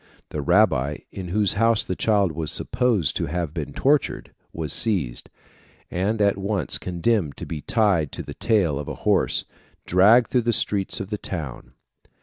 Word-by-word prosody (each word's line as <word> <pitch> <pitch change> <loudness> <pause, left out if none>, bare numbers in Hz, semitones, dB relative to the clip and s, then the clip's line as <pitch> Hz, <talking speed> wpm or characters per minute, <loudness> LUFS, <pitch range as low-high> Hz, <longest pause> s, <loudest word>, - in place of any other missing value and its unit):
The 75 - -4
rabbi, 75 -5 +2
in 95 -2 -7
whose 100 +2 +1
house 115 +1 +2
the 95 - -4
child 100 -4 +2
was 80 0 -2
supposed 115 - 0
to - - -2
have 85 0 -3
been 75 -4 -5
tortured, 140 - 0 0.2
was 80 -4 0
seized, 90 - +1 0.6
and 100 +5 -1
at 100 -1 +2
once 95 - -1
condemned 90 -2 -1
to - - -6
be 75 -2 -6
tied 95 - +1
to - - -5
the - - -8
tail 90 -11 +1
of 75 - -6
a - - -5
horse, - - +2
and - - -33
dragged 105 +7 +5
through 125 - +3
the 120 0 0
streets 100 -2 0
of 100 +1 -6
the 105 - -3
town. 80 -9 -6
95 Hz, 175 wpm, -23 LUFS, 80-110 Hz, 0.6 s, dragged